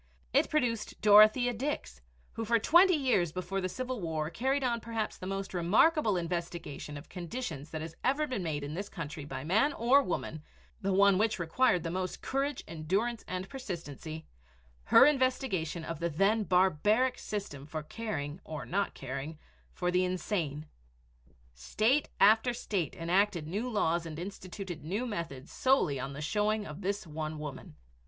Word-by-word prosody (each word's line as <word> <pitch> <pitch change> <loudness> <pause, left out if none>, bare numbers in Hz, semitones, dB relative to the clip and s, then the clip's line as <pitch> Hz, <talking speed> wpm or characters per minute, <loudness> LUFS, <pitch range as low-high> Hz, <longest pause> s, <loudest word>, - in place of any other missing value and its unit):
It - - +3
produced 235 -7 -1
Dorothea 215 +4 +7
Dix, 215 - -4 0.3
who 225 - -3
for 230 +1 +3
twenty 350 - +6
years 250 - +2
before 185 +2 -3
the 185 - -2
Civil 255 +1 -4
War 160 -2 -2
carried 270 +5 0
on 240 -2 +1
perhaps 225 -1 -3
the 185 - -7
most 195 0 -4
remarkable 210 - +3
investigation 170 -4 -4
of 145 - -11
conditions 175 - -5
that 160 - -5
has 165 0 -8
ever 280 +4 +2
been 255 -8 -3
made 155 -4 -2
in 145 +1 -5
this 200 +5 -4
country 150 -3 -6
by 140 - -6
man 220 - +2
or 255 +4 +4
woman, 160 - -3 0.4
the 195 -1 0
one 195 0 +5
which 215 0 +2
required 175 +2 +2
the 165 - -3
most 185 0 -3
courage, 275 0 -2
endurance, 195 +9 -1
and 185 +1 -4
persistency, 165 - -7 0.6
her - - +8
investigation 255 - +1
of 165 -2 -5
the 170 - 0
then 200 +7 +2
barbaric 190 +8 +3
system 170 -10 -5
for 155 0 -5
caring 165 -5 -5
or 155 -1 -6
not 200 +3 -1
caring 140 +4 -5 0.3
for 180 0 -1
the 180 +1 +3
insane. 175 -5 -2 0.9
State 215 - +1
after 225 +4 +5
state 185 - -2
enacted 180 0 +1
new 205 +10 -3
laws 170 -6 0
and 155 -2 -7
instituted 185 -1 -7
new 200 +10 -2
methods 165 - -5
solely 255 - +2
on 135 +2 -4
the 145 - -6
showing 210 +6 0
of 155 +4 -8
this 200 +1 -2
one 155 0 -5
woman. 145 - -7
185 Hz, 160 wpm, -31 LUFS, 160-225 Hz, 0.9 s, her